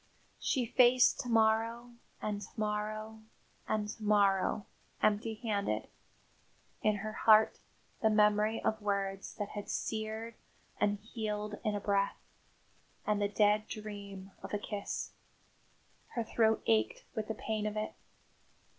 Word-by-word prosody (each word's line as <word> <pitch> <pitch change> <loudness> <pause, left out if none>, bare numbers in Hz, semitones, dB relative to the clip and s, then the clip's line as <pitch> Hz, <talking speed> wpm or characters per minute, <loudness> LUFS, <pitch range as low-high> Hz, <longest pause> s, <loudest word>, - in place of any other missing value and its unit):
She 255 -4 +1
faced 250 +2 +5
to 245 - -3
morrow, 230 +1 +2 0.3
and 205 -1 -2
to - - -7
morrow, 215 +1 -2 0.5
and 215 -1 0
to 215 - -7
morrow 205 -1 +3 0.3
empty 215 +1 +2
handed 200 - -1 0.9
in 215 -1 +3
her 215 +1 -4
heart 220 0 +5 0.4
the 220 - +4
memory 210 +1 +3
of 220 0 0
words 195 -1 -2
that 205 -1 -3
had 205 -1 -6
seared 220 +1 -3 0.5
and 205 0 +2
healed 210 -1 -4
in 210 -2 0
a - - -1
breath, 200 0 +1 0.9
and 210 -1 +1
the 205 - +3
dead 210 +1 +3
dream 200 -2 -7
of - - -4
a - - +2
kiss. 205 0 -4 1.0
Her 235 - 0
throat 220 0 +2
ached 110 -1 +2
with 215 -1 -3
the 220 - -3
pain 215 -1 -2
of 210 0 -3
it. 215 - -2
215 Hz, 135 wpm, -33 LUFS, 205-220 Hz, 1.0 s, faced